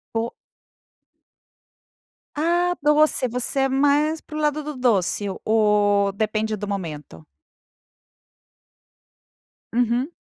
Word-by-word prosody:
O 230 +1 -1 2.0
Ah, 345 +3 +1
doce. 300 -3 +3
Você 250 +3 -2
é 270 - +2
mais 290 +3 +2
para 305 - -12
o - - -2
lado 300 0 0
do 300 0 -6
doce 210 -5 +1
o 190 - -6
ou 205 -2 +3
depende 215 +1 -1
do 205 0 -6
momento? 150 - -6 2.5
Uhum. 245 +6 0
240 Hz, 100 wpm, -22 LUFS, 205-295 Hz, 2.5 s, doce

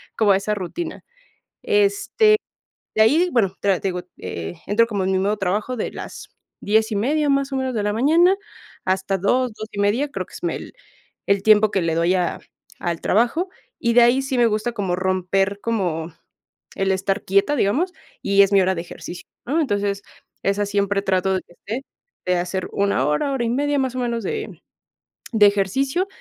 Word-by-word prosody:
como 210 -3 +3
a 190 - +5
esa 210 +1 -2
rutina. 210 - -5 0.6
Este, 420 0 +3 0.6
de 220 - +4
ahí, 315 +11 +4
bueno, 195 -6 +1
tra 195 -3 +1
te - - -2
digo, 180 -1 -2 0.2
eh, 85 -2 -5
entro 220 +3 +4
como 205 -4 -2
en 190 - 0
mi 190 - +2
modo 200 +3 +1
trabajo 205 +6 -1
de - - -2
las - - -9 0.3
10:30 220 +8 +1
más 275 0 +1
o 270 - -1
menos, 260 -1 -1
de 215 - -1
la 210 - +1
mañana, 325 - +4 0.5
hasta 190 +1 0
2 245 +6 +1
2:30 215 +5 -1
creo - - -4
que - - -23
es, - - -9
mm, - - +1
el - - -7 0.5
el 200 0 +1
tiempo 215 -1 +5
que 190 - +1
le 165 -1 0
doy 170 +2 +2
a 180 -2 -1 0.4
al 170 -2 -3
trabajo, 245 - +1 0.3
y 235 - +1
de 245 - +7
ahí 240 +3 +4
sí 270 -1 -2
me 240 - +5
gusta 215 +2 0
como 195 -6 -2
romper 190 +2 0
como 175 -8 -2 0.6
el 195 0 +1
estar 195 +2 -1
quieta, 200 +10 +2
digamos, 290 - +1 0.3
y 200 0 +5
es 195 - +2
mi 195 - +6
hora 185 0 +1
de 165 - -3
ejercicio, 175 0 -9 0.2
¿no? 305 +6 0
Entonces, 205 -6 -1 0.4
esa 200 +1 +1
siempre 200 0 0
trato 190 -1 +1
de 185 - 0
que 175 - -22
esté, 225 +9 -5 0.4
de 180 0 +1
hacer 180 +1 -3
una 200 -10 +1
hora, 150 - 0
hora 260 -3 -1
y 230 - 0
media, 285 +3 +1
más 260 -1 -2
o - - -2
menos, 235 -2 -1
de 430 -1 -5 0.7
de 215 -2 +6
ejercicio 265 - +1
205 Hz, 190 wpm, -22 LUFS, 190-255 Hz, 0.7 s, de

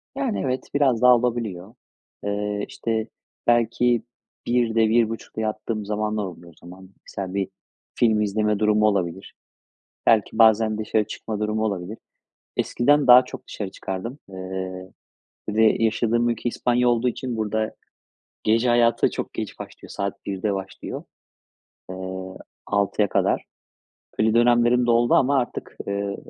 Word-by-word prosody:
Yani, 270 -6 -1
evet 130 0 -2
biraz 130 -5 +2
daha 125 0 +8
olabiliyor. 115 -5 -2 0.5
Iıı, 105 0 -2
işte, 115 -1 -2 0.4
belki 120 0 +3 0.5
01.00'de, 115 -2 +2
01.30'da 115 -1 0
yattığım 110 0 -3
zamanlar 105 0 -1
oluyor 85 -2 -10
o - - -30
zaman. 95 +1 -12 0.2
Misal 95 -1 -5
bir 95 -1 -1 0.5
film 110 -3 +3
izleme 105 0 0
durumu 105 0 +3
olabilir. 95 -2 -2 0.7
Belki 110 -1 +3
bazen 110 -1 +5
dışarı 110 0 0
çıkma 110 -1 -5
durumu 105 +1 -1
olabilir. 100 0 -3 0.6
Eskiden 145 +4 +2
daha 125 +1 +9
çok - - -10
dışarı 100 -3 -5
çıkardım, 95 +8 -6
ııı, 95 0 -6 0.6
bir 105 - -4
de 110 0 +4
yaşadığım 120 +2 +2
ülke 120 +1 -1
İspanya 125 +1 +1
olduğu 120 +1 +2
için 120 -1 -5
burada 110 0 -1 0.7
gece 115 +3 +3
hayatı 120 -1 +3
da - - 0
çok - - -5
geç - - -5
başlıyor. - - -10
Saat 100 0 -4
01.00'de 100 +1 -1
başlıyor, 95 0 -6 0.9
ııı, 95 0 -6 0.3
06.00'ya 100 0 +1
kadar. - - +1 0.8
Öyle 110 0 +3
dönemlerim 120 +1 +4
de 120 - +1
doldu 120 0 +3
ama 140 +1 +4
artık, 120 - -5
ııı, 100 0 -2
110 Hz, 135 wpm, -23 LUFS, 100-120 Hz, 0.9 s, daha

